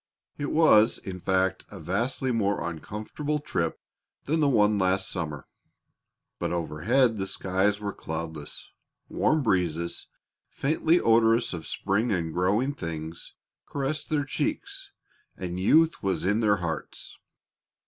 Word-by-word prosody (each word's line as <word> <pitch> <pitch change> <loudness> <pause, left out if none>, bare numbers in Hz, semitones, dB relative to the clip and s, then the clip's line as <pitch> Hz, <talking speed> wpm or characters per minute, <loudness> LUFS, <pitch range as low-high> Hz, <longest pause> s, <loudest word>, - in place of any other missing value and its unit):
It 145 - -2
was, 115 -9 +5
in 95 -1 -7
fact, 95 +1 +1
a - - -9
vastly 115 - -1
more 100 -6 0
uncomfortable 105 - -4
trip 85 - -2 0.5
than 160 +3 +1
the 145 -2 +3
one 105 -4 +3
last 95 +1 +1
summer. 75 -6 -4 0.9
But - - -2
overhead 100 - +1
the 95 - -2
skies 95 +2 0
were 100 -1 -4
cloudless; 80 -2 -6 0.4
warm 155 -2 +2
breezes, 85 -6 -1 0.4
faintly 160 +4 +2
odorous 115 - +3
of 80 -2 -6
spring 110 +5 0
and 85 -4 -1
growing 105 +10 +1
things, 80 - -6 0.3
caressed 145 +2 -3
their 150 -2 +1
cheeks, - - -3 0.5
and 90 -1 -4
youth 160 - +4
was 95 -5 -1
in 105 +3 +2
their 105 -3 +4
hearts. 85 -4 -5
100 Hz, 130 wpm, -27 LUFS, 85-125 Hz, 0.9 s, was